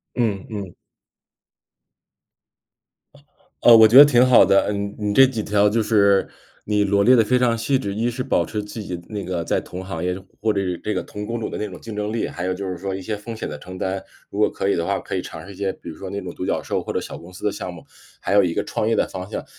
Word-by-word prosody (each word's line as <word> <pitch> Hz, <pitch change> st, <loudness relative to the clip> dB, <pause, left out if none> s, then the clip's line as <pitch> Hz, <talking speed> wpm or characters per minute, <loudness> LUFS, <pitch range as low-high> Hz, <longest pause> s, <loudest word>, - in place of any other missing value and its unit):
嗯 105 Hz, -6 st, -1 dB
嗯。 100 Hz, -5 st, -6 dB, 2.9 s
呃， 115 Hz, -1 st, +9 dB
我 110 Hz, -1 st, +8 dB
觉 115 Hz, -, +1 dB
得 -, -, +13 dB
挺 125 Hz, -4 st, +5 dB
好 125 Hz, -1 st, +7 dB
的， 100 Hz, -, +4 dB
嗯 100 Hz, 0 st, -2 dB
嗯， 105 Hz, -, -1 dB
你 -, -, 0 dB
这 135 Hz, +4 st, +7 dB
几 115 Hz, -5 st, -3 dB
条 105 Hz, 0 st, +3 dB
就 110 Hz, +2 st, +1 dB
是 100 Hz, -2 st, +3 dB, 0.4 s
你 105 Hz, -1 st, +1 dB
罗 100 Hz, 0 st, +2 dB
列 125 Hz, +4 st, +6 dB
得 115 Hz, -, +5 dB
非 125 Hz, +4 st, +2 dB
常 120 Hz, -2 st, +2 dB
细 130 Hz, +4 st, +1 dB
致， 100 Hz, -6 st, -4 dB
一 115 Hz, +4 st, 0 dB
是 125 Hz, +2 st, -4 dB
保 135 Hz, -, +1 dB
持 105 Hz, -1 st, -4 dB
自己 105 Hz, -4 st, -6 dB
那 105 Hz, -2 st, -5 dB
个 90 Hz, -2 st, -3 dB
在 -, -, 0 dB
同 90 Hz, +1 st, -8 dB
行 90 Hz, -3 st, -5 dB
业， 90 Hz, 0 st, -1 dB, 0.3 s
或 110 Hz, 0 st, +2 dB
者 100 Hz, -, -1 dB
是 90 Hz, -3 st, -3 dB
这 105 Hz, -, -3 dB
个 -, -, -2 dB
同 105 Hz, 0 st, -7 dB
工 120 Hz, 0 st, -3 dB
种 110 Hz, -, -3 dB
的 -, -, -5 dB
那 105 Hz, -, -2 dB
种 90 Hz, -3 st, -10 dB
竞 110 Hz, -2 st, -8 dB
争 105 Hz, 0 st, -2 dB
力。 115 Hz, -, -1 dB
还 85 Hz, -, -5 dB
有 95 Hz, 0 st, -1 dB
就 100 Hz, +1 st, -5 dB
是 90 Hz, -, -3 dB
说 95 Hz, +1 st, -3 dB
一 95 Hz, -, -5 dB
些 110 Hz, +3 st, -3 dB
风 115 Hz, +3 st, -8 dB
险 -, -, -4 dB
的 75 Hz, -1 st, -7 dB
承 95 Hz, +3 st, -10 dB
担。 95 Hz, +1 st, -3 dB, 0.3 s
如 100 Hz, -, -5 dB
果 105 Hz, -, +4 dB
可 95 Hz, -, -3 dB
以 100 Hz, -, +2 dB
的 85 Hz, -, -1 dB
话 -, -, 0 dB
可 -, -, -6 dB
以 -, -, -1 dB
尝 -, -, -9 dB
试 100 Hz, -, -10 dB
一 -, -, -14 dB
些， 100 Hz, 0 st, -2 dB
比 -, -, -11 dB
如 80 Hz, -, -8 dB
说 95 Hz, -, -8 dB
那 100 Hz, +1 st, -4 dB
种 90 Hz, -2 st, -7 dB
独 -, -, -6 dB
角 -, -, -1 dB
兽 -, -, -2 dB
或 -, -, -5 dB
者 -, -, -1 dB
小 -, -, -7 dB
公 85 Hz, -, -13 dB
司 90 Hz, -, -9 dB
的 105 Hz, -, +2 dB
项 90 Hz, -, -6 dB
目， 85 Hz, -2 st, -12 dB, 0.3 s
还 -, -, -2 dB
有 100 Hz, 0 st, +6 dB
一 85 Hz, -2 st, -1 dB
个 -, -, 0 dB
创 110 Hz, -, -2 dB
业 115 Hz, -, +2 dB
的 -, -, +1 dB
方 95 Hz, 0 st, -7 dB
向。 -, -, -5 dB
100 Hz, 305 characters per minute, -22 LUFS, 95-110 Hz, 2.9 s, 得